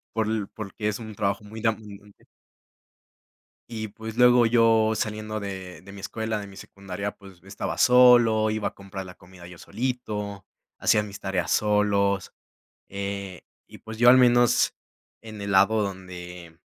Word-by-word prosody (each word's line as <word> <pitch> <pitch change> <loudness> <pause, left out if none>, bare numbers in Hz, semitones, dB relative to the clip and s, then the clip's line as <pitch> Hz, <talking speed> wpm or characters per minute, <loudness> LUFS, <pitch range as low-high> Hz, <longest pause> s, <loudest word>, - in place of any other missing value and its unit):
Por 110 -1 0
l 110 -2 -2
porque 105 0 -5
es 105 - -4
un 110 -2 -9
trabajo 100 +1 -1
muy 110 +2 -10
demandante. 105 -3 -5 1.4
Y 110 -2 -5
pues, 110 +2 -9
luego 125 -1 +6
yo 115 -1 +3
saliendo 110 0 -3
de 95 -4 -7
de 100 - -13
mi 100 -1 -10
escuela, 110 +1 -3
de 100 - -8
mi 100 -1 -14
secundaria, 100 +1 -6
pues, 95 -3 -17
estaba 95 +1 -5
solo, 120 -3 +5
iba 105 -1 -1
a - - -25
comprar 100 -1 -8
la 90 0 -11
comida 90 -1 -15
yo 90 0 -12
solito, 105 -3 -4 0.3
hacía 105 - +2
mis 100 -1 -9
tareas 95 -4 -2
solos, 100 -2 +1 0.6
eh, 100 -1 -6 0.2
y - - -13
pues, 110 0 -9
yo 120 +1 +6
al 130 - +8
menos 120 -1 +4 0.5
en 110 -2 -10
el 100 0 -4
lado 105 +3 +4
donde 90 -3 -7
105 Hz, 160 wpm, -25 LUFS, 100-110 Hz, 1.4 s, al